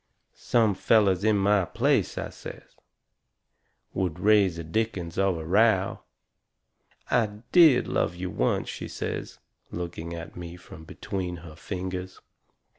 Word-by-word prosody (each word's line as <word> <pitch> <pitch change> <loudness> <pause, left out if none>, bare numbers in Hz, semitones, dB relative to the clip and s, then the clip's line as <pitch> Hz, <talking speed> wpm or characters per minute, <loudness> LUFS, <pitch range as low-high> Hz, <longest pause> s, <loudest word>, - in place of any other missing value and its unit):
"Some 110 -4 +2
fellers 100 -2 +3
in 110 -1 +3
my 100 0 +3
place," - - 0
I - - -3
says, - - -11 1.2
"would 90 -3 -2
raise 100 -3 +4
a 85 - -5
dickens 90 -1 -2
of 95 -3 +2
a 80 - -6
row." 100 +2 +3 1.1
"I 115 -3 +3 0.2
DID 160 -8 +6
love 85 - 0
you 90 0 -5
once," - - 0
she - - -6
says, - - -5 0.3
looking 85 -1 -5
at 85 0 -8
me 85 -1 -7
from 90 -2 -13
between 90 +1 -5
her 75 -2 -11
fingers. 95 +1 -5
95 Hz, 130 wpm, -26 LUFS, 85-105 Hz, 1.2 s, DID